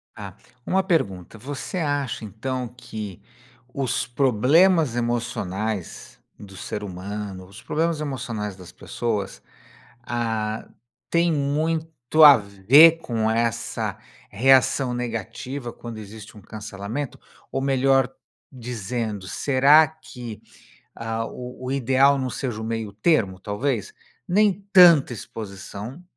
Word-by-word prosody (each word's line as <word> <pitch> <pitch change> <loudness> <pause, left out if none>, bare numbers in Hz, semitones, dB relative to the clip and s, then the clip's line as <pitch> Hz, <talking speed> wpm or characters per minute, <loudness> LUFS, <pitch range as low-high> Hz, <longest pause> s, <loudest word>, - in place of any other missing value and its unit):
Tá. 100 -3 -8 0.3
Uma 190 +1 +2
pergunta: 115 - -1
Você 140 - -6
acha 145 -7 -2
então 125 +4 -4
que 110 -6 -8 0.5
os 130 -3 -1
problemas 140 - +3
emocionais 110 -5 -3 0.2
do 100 -2 -12
ser 105 +2 -5
humano, 95 0 -6
os 100 +2 -13
problemas 165 0 -1
emocionais 120 -8 -4
das 90 -2 -13
pessoas, 105 -5 -4 0.6
ah, 110 -3 -2 0.4
tem 170 0 +2
muito 155 0 +1
a 145 -2 +11
ver 120 +12 +6
com 110 -5 -1
essa 115 0 -1 0.3
reação 130 +3 +3
negativa 120 +2 -5
quando 120 -2 -9
existe 110 +1 -11
um - - -12
cancelamento? 110 +6 -6 0.3
Ou 135 - -2
melhor 135 -1 +3 0.4
dizendo, 115 -5 -4
será 140 - +5
que 125 -8 -10 0.5
a 115 0 -3
o 125 +1 -8
o - - -3
ideal 135 +1 +3
não 130 -1 -2
seja 120 -5 -4
o - - -5
meio 110 -2 -3
termo 105 - +1
talvez? 130 - -2 0.3
Nem 205 +3 +4 0.2
tanta 170 -9 +7
exposição 105 - -8
120 Hz, 110 wpm, -23 LUFS, 105-140 Hz, 0.6 s, a